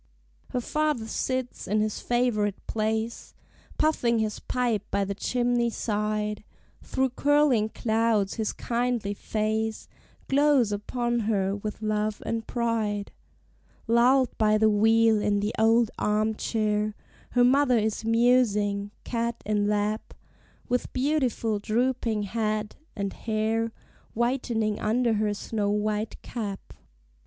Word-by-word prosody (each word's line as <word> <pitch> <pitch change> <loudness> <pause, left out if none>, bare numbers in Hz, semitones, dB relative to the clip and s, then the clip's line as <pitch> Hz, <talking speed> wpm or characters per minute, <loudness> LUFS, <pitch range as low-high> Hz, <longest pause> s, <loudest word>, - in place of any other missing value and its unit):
Her 250 - -2
father 300 -3 0
sits 255 +2 -3
in 210 +2 +1
his 215 0 -1
favorite 230 -5 0
place, 220 +1 -2 0.4
Puffing 245 -7 +2
his 215 -1 -1
pipe 240 -5 0
by 200 0 0
the 200 - -3
chimney 240 +2 0
side; 210 -1 -2 0.4
Through 265 -1 -1
curling 275 -5 +3
clouds 220 -3 +1
his 220 -2 -1
kindly 235 -4 -1
face 220 +1 -2 0.4
Glows 275 -5 +3
upon 240 +3 -1
her 195 -2 +1
with 210 +1 -6
love 215 0 -1
and 225 -1 -3
pride. 220 -4 -1 0.7
Lulled 245 +3 +3
by 215 -1 +4
the 215 0 +4
wheel, 225 +1 +4
in 205 0 +1
the 210 +2 -1
old 225 0 +4
arm 215 +1 +1
chair 215 -1 -1 0.4
Her 245 - +4
mother 255 0 +4
is 220 0 -1
musing, 220 -4 +2
cat 235 -1 -2
in 205 -1 +1
lap, 210 +1 -1 0.5
With 250 -1 -1
beautiful 255 -6 0
drooping 230 0 0
head, 215 0 -2 0.2
and 200 -1 -3
hair 225 +1 -1 0.4
Whitening 235 -3 0
under 235 +2 +1
her 210 -1 0
snow 205 0 -2
white 210 +1 -1
cap. 205 -5 -6
220 Hz, 120 wpm, -27 LUFS, 210-240 Hz, 0.7 s, by